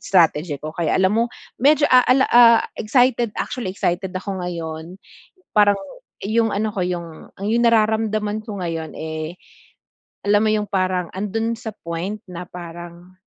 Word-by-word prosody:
strategy 165 Hz, -4 st, +2 dB
ko 155 Hz, -, -5 dB
kaya 165 Hz, -2 st, 0 dB
alam 190 Hz, +3 st, +3 dB
mo, 230 Hz, -, +3 dB, 0.3 s
medyo 290 Hz, +3 st, +4 dB
ah 255 Hz, -1 st, +6 dB
ah 255 Hz, -, +4 dB
la 270 Hz, -, +3 dB
ah, 235 Hz, -1 st, +7 dB, 0.2 s
excited, 240 Hz, 0 st, +2 dB
actually 235 Hz, -8 st, -3 dB
excited 185 Hz, -1 st, -2 dB
ako 190 Hz, +1 st, -4 dB
ngayon. 165 Hz, +1 st, -6 dB, 0.6 s
Parang 205 Hz, -1 st, +5 dB, 0.5 s
iyung 225 Hz, +1 st, +1 dB
ano 215 Hz, +2 st, 0 dB
ko 195 Hz, -, -2 dB
'yung, 170 Hz, -3 st, -6 dB
ang 200 Hz, -, -5 dB
'yung 235 Hz, +2 st, +2 dB
nararamdaman 215 Hz, -1 st, +1 dB
ko 205 Hz, -4 st, -6 dB
ngayon, 165 Hz, -2 st, -4 dB
eh, 160 Hz, +1 st, -5 dB, 0.9 s
alam 205 Hz, 0 st, +4 dB
mo 220 Hz, -, +2 dB
'yung 210 Hz, -1 st, 0 dB
parang, 185 Hz, -3 st, 0 dB
andun 225 Hz, +4 st, -2 dB
sa 225 Hz, -1 st, -7 dB
point 175 Hz, +3 st, -5 dB
na 180 Hz, -1 st, -7 dB
parang, 175 Hz, 0 st, -10 dB
200 Hz, 160 wpm, -21 LUFS, 175-220 Hz, 0.9 s, ah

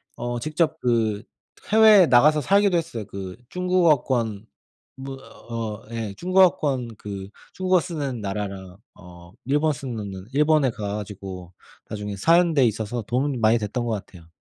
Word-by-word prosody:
어 120 Hz, 0 st, -4 dB
직접 155 Hz, +4 st, -1 dB
그 110 Hz, -5 st, 0 dB, 0.5 s
해외에 215 Hz, -3 st, +7 dB
나가서 150 Hz, +5 st, +5 dB
살기도 200 Hz, +3 st, +3 dB
했어요. 155 Hz, -10 st, -4 dB
그 95 Hz, -2 st, -7 dB
중국어권 150 Hz, -, +1 dB, 0.5 s
뭐 135 Hz, 0 st, -7 dB, 0.4 s
어 110 Hz, -3 st, -4 dB
예 115 Hz, -3 st, -4 dB
중국어권 155 Hz, -, +2 dB
그 100 Hz, -2 st, -7 dB, 0.2 s
중국어 185 Hz, -1 st, +2 dB
쓰는 145 Hz, -8 st, -4 dB
나라랑 95 Hz, -2 st, -5 dB, 0.2 s
어 85 Hz, -1 st, -14 dB
일본 150 Hz, +4 st, +1 dB
쓰느는 105 Hz, -8 st, -6 dB
일본에 150 Hz, -1 st, +3 dB
가 105 Hz, -3 st, -4 dB
가지고 95 Hz, -3 st, -8 dB, 0.4 s
나중에 105 Hz, -1 st, -5 dB
사는 165 Hz, -, +3 dB
데 140 Hz, -4 st, +4 dB
있어서 110 Hz, +1 st, -2 dB
도움이 130 Hz, +5 st, -1 dB
많이 115 Hz, 0 st, +3 dB
됐던 115 Hz, +3 st, -3 dB
것 115 Hz, -, -2 dB
같아요. 95 Hz, -5 st, -7 dB
120 Hz, 290 characters per minute, -23 LUFS, 105-155 Hz, 0.5 s, 해외에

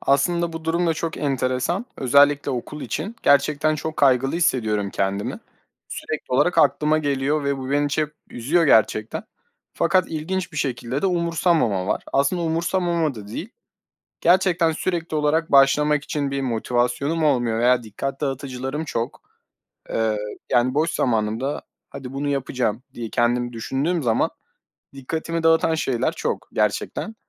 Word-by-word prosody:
Aslında 170 Hz, +5 st, +1 dB
bu 165 Hz, 0 st, -7 dB
durum 170 Hz, +2 st, +1 dB
da 165 Hz, -, +2 dB
çok 165 Hz, 0 st, -3 dB
enteresan. 135 Hz, -, -1 dB
Özellikle 145 Hz, +2 st, +4 dB
okul 135 Hz, +4 st, -5 dB
için 195 Hz, +11 st, -4 dB
gerçekten 145 Hz, +2 st, +3 dB
çok 155 Hz, +1 st, -5 dB
kaygılı 135 Hz, 0 st, +3 dB
hissediyorum 110 Hz, -, +1 dB
kendimi. 100 Hz, +1 st, -2 dB, 0.5 s
Sürekli 155 Hz, -4 st, -5 dB
olarak 175 Hz, +7 st, +3 dB
aklıma 155 Hz, +1 st, +3 dB
geliyor 145 Hz, 0 st, 0 dB
ve 140 Hz, -1 st, 0 dB
bu 130 Hz, 0 st, -5 dB
beni 145 Hz, +1 st, +2 dB
çep 150 Hz, +1 st, -1 dB, 0.2 s
üzüyor 155 Hz, +9 st, +1 dB
gerçekten 110 Hz, -3 st, +2 dB, 0.5 s
fakat 185 Hz, -2 st, +3 dB
ilginç 175 Hz, +4 st, -3 dB
bir -, -, -9 dB
şekilde 130 Hz, -2 st, -2 dB
de -, -, +3 dB
umursamama 165 Hz, -, +1 dB
var. -, -, -1 dB
Aslında 140 Hz, +6 st, +1 dB
umursamama 170 Hz, -1 st, 0 dB
da 105 Hz, -3 st, -10 dB
değil, 170 Hz, -, -6 dB, 0.7 s
gerçekten 175 Hz, -2 st, +3 dB
sürekli 165 Hz, 0 st, -2 dB
olarak 155 Hz, +2 st, +1 dB
başlamak 150 Hz, +2 st, +4 dB
için 145 Hz, -2 st, -2 dB
bir 140 Hz, 0 st, -1 dB
motivasyonum 125 Hz, +5 st, 0 dB
olmuyor 120 Hz, -6 st, +2 dB
veya 125 Hz, 0 st, +3 dB
dikkat 135 Hz, +6 st, -5 dB
dağıtıcılarım 135 Hz, +1 st, -3 dB
çok. 115 Hz, -5 st, -4 dB, 0.7 s
Eee, 110 Hz, -1 st, 0 dB, 0.3 s
yani 125 Hz, +1 st, +3 dB
boş 155 Hz, +4 st, +1 dB
zamanımda 115 Hz, +4 st, -1 dB, 0.3 s
hadi 130 Hz, -1 st, -8 dB
bunu 140 Hz, +1 st, -2 dB
yapacağım 130 Hz, -4 st, -1 dB
diye 115 Hz, -4 st, -6 dB
kendimi 120 Hz, +1 st, 0 dB
düşündüğüm 140 Hz, +9 st, -1 dB
zaman 115 Hz, -3 st, +2 dB, 0.6 s
dikkatimi 160 Hz, +5 st, -4 dB
dağıtan 165 Hz, 0 st, +4 dB
şeyler 130 Hz, -6 st, 0 dB
çok -, -, -4 dB
gerçekten. 105 Hz, -, -1 dB
140 Hz, 140 wpm, -22 LUFS, 125-160 Hz, 0.7 s, Özellikle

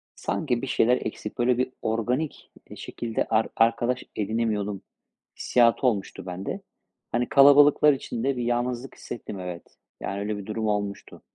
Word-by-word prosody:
sanki 125 Hz, -6 st, -1 dB
bir 135 Hz, -, -4 dB
şeyler 125 Hz, 0 st, +3 dB
eksik, 105 Hz, -1 st, -6 dB
böyle, 120 Hz, 0 st, +2 dB
bir 130 Hz, 0 st, 0 dB
organik, 120 Hz, +7 st, -2 dB, 0.2 s
eee, -, -, -9 dB
şekilde 115 Hz, -2 st, -3 dB
ar 110 Hz, 0 st, +2 dB
arkadaş 120 Hz, +2 st, +2 dB
edinemiyordum 105 Hz, -2 st, -1 dB, 0.6 s
hissiyatı 120 Hz, +2 st, +3 dB
olmuştu 95 Hz, -4 st, -2 dB
bende. 95 Hz, +1 st, -5 dB, 0.5 s
Hani, 120 Hz, +1 st, 0 dB
kalabalıklar 145 Hz, +1 st, +7 dB
içinde 130 Hz, 0 st, -2 dB
bir 120 Hz, -, -2 dB
yalnızlık 120 Hz, +2 st, -2 dB
hissettim, 105 Hz, -4 st, -7 dB
evet, 90 Hz, -2 st, -8 dB, 0.2 s
yani, 100 Hz, +1 st, -3 dB
öyle 105 Hz, +1 st, -2 dB
bir 100 Hz, -, -7 dB
durum 110 Hz, 0 st, -3 dB
olmuştu. 100 Hz, -1 st, -3 dB
115 Hz, 145 wpm, -26 LUFS, 105-125 Hz, 0.6 s, kalabalıklar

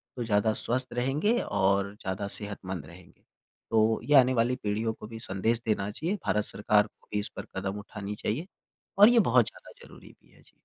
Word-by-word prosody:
तो 125 Hz, -, -3 dB
ज़्यादा 110 Hz, 0 st, +2 dB
स्वस्थ 125 Hz, +4 st, -1 dB
रहेंगे 140 Hz, -, +1 dB
और 100 Hz, +1 st, +1 dB
ज़्यादा 95 Hz, 0 st, -4 dB
सेहतमंद 95 Hz, -6 st, -6 dB
रहेंगे। 85 Hz, +3 st, -16 dB, 0.5 s
तो 110 Hz, 0 st, +3 dB
ये 150 Hz, -, +3 dB
आने 130 Hz, -1 st, +6 dB
वाली 120 Hz, +1 st, +2 dB
पीढ़ियों 110 Hz, +2 st, -1 dB
को 105 Hz, -, -10 dB
भी 115 Hz, 0 st, -8 dB
संदेश 110 Hz, +3 st, -1 dB
देना 105 Hz, -3 st, 0 dB
चाहिए, 165 Hz, -, -2 dB
भारत 105 Hz, -, +1 dB
सरकार 105 Hz, 0 st, +2 dB
को -, -, -32 dB
भी 105 Hz, -, +1 dB
इस 105 Hz, -, -3 dB
पर -, -, -6 dB
कदम 95 Hz, +2 st, -3 dB
उठानी 105 Hz, 0 st, -7 dB
चाहिए, 140 Hz, -, -3 dB, 0.5 s
और 205 Hz, +3 st, +9 dB
ये 240 Hz, -1 st, +5 dB
बहुत 215 Hz, -, +4 dB
ज़्यादा -, -, -10 dB
ज़रूरी -, -, -15 dB
भी -, -, -26 dB
है। -, -, -22 dB
जी। -, -, -21 dB
110 Hz, 195 wpm, -28 LUFS, 100-120 Hz, 0.5 s, और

